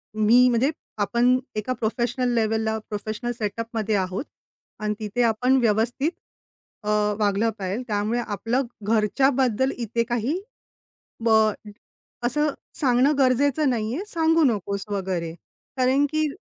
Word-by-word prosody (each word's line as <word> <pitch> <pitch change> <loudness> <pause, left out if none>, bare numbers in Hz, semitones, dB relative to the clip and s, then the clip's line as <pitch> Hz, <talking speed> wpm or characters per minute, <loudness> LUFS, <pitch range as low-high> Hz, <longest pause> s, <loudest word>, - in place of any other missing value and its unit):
मी 230 +4 +5
म्हणजे 250 +5 +2 0.3
आपण 240 +4 +3 0.2
एका 215 +4 -1
प्रोफेशनल 240 +2 -1
लेवलला, 220 0 +1
प्रोफेशनल 215 +3 -4
सेटअपमध्ये 220 0 -2
आहोत 190 +6 -2 0.5
आणि 210 -1 -1
तिथे 215 +3 -2
आपण 250 +4 +3
व्यवस्थित 235 +7 +1 0.7
अ, - - -8 0.3
वागलं 210 +2 +2
पजिजे. 195 +5 -2
त्यामुळे 215 +2 0
आपलं 225 +5 -1 0.2
घरच्याबद्दल 250 +4 +2
इथे 235 0 -1
काही 245 - -1 0.8
ब 230 - +3 0.9
असं 295 +5 +1 0.3
सांगणं 255 +1 +4
गरजेचं 275 +2 +3
नाही 230 -1 -1
आहे, 365 - -3
सांगू 325 -2 +2
नकोस 200 -5 0
वगैरे, 185 -5 -2 0.4
कारण 260 +2 +3
की 310 0 +2
230 Hz, 115 wpm, -24 LUFS, 215-255 Hz, 0.9 s, मी